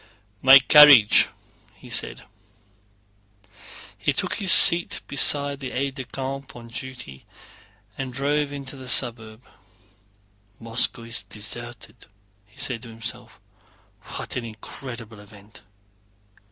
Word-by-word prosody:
"My 135 +1 +8
carriage!" 135 -5 +6 0.5
he - - -17
said. - - -1 1.7
He - - -2
took - - -2
his 190 -3 +2
seat 170 0 +7
beside 140 0 +1
the 135 -2 -7
aide 135 +2 -4
de 130 -1 -9
camp 135 +1 -8
on 115 -1 -13
duty 120 - -10 0.7
and 135 -1 -6
drove 145 +3 -3
into 140 -1 -8
the 130 -1 -11
suburb. 115 -3 -2 1.2
"Moscow 115 0 -4 0.2
deserted!" 115 +2 -9 0.4
he 105 - -21
said 120 -4 -4
to 120 - -11
himself. 115 +1 -9 0.8
"What - - -8
an 125 - -5
incredible 115 0 -10
event!" 105 0 -17
125 Hz, 110 wpm, -22 LUFS, 115-135 Hz, 1.7 s, My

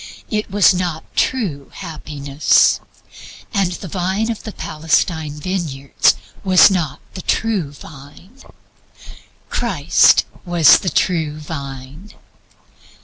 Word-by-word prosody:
This 210 -1 -1
was 200 0 +4
not 175 -3 -3
true 180 - -1
happiness, 145 -2 +1 0.7
and 195 -4 +1
the 185 - -7
vine 190 +6 -1
of 225 - -6
the 215 - -7
Palestine 160 -2 -1
vineyards 150 -6 0 0.3
was 190 0 +6
not 160 -6 -2
the 185 - -7
true 205 -6 -1
vine. 145 - -15 1.1
"Christ - - +3 0.2
was 175 -4 +5
the 185 - -2
true 160 -2 0
Vine." 140 +3 -8
170 Hz, 100 wpm, -18 LUFS, 150-190 Hz, 1.1 s, was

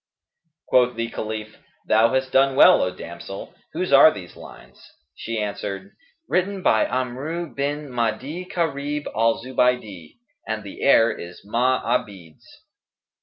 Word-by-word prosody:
Quoth 125 -1 +3
the 115 0 -3
Caliph, 110 0 -6 0.3
"Thou 110 +2 +4
hast 130 0 -1
done 135 0 +3
well, - - +7
O 90 - +1
damsel! 90 +2 -9 0.2
whose - - -2
are - - +9
these - - -10
lines?" - - -14 0.3
She 115 +9 -5
answered, 105 - -4 0.4
"Written 190 +1 -1
by 110 - +3
Amru 135 +7 -3
bin 145 0 -3
Ma'di 125 +9 -2
Karib 150 -3 -2
al 115 +1 +1
Zubaydi,[FN#216] 125 -9 -1 0.3
and 110 -1 -3
the 100 - -10
air 115 -4 +5
is 90 -2 -10
Ma'abid's." 115 -7 -1
120 Hz, 125 wpm, -23 LUFS, 110-140 Hz, 0.4 s, are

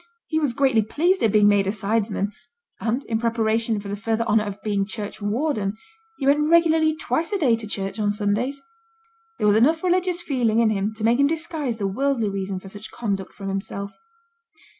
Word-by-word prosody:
He 315 - 0
was 285 -6 0
greatly 265 -5 +3
pleased 340 - +1
at 220 - +3
being 210 -1 +5
made 200 -1 +3
a - - +2
sidesman; 205 0 -1 0.5
and, 235 +4 -1
in 225 -1 -2
preparation 225 -1 0
for 200 - -8
the 200 - -3
further 225 +2 -1
honour 215 -2 +2
of 205 0 -6
being 205 -2 0
churchwarden, 210 +2 -2 0.4
he 270 - -3
went 295 +2 +3
regularly 320 -2 +4
twice 325 +3 -2
a 405 - +1
day 265 -10 +3
to 220 -1 -7
church 195 0 -4
on 210 -1 +1
Sundays. 210 +7 -1 0.8
There - - -1
was 205 0 +5
enough 315 +9 +3
religious 365 -1 +1
feeling 245 -8 +1
in 230 -2 +4
him 205 0 -1
to 215 - -7
make 235 +3 +3
him 280 - +5
disguise 310 -6 -2
the 205 - -2
worldly 235 +2 0
reason 195 -1 -3
for 195 - -12
such 205 +2 -9
conduct 200 -5 -3
from 195 -1 -6
himself. 200 +1 -4
225 Hz, 195 wpm, -23 LUFS, 205-280 Hz, 0.8 s, being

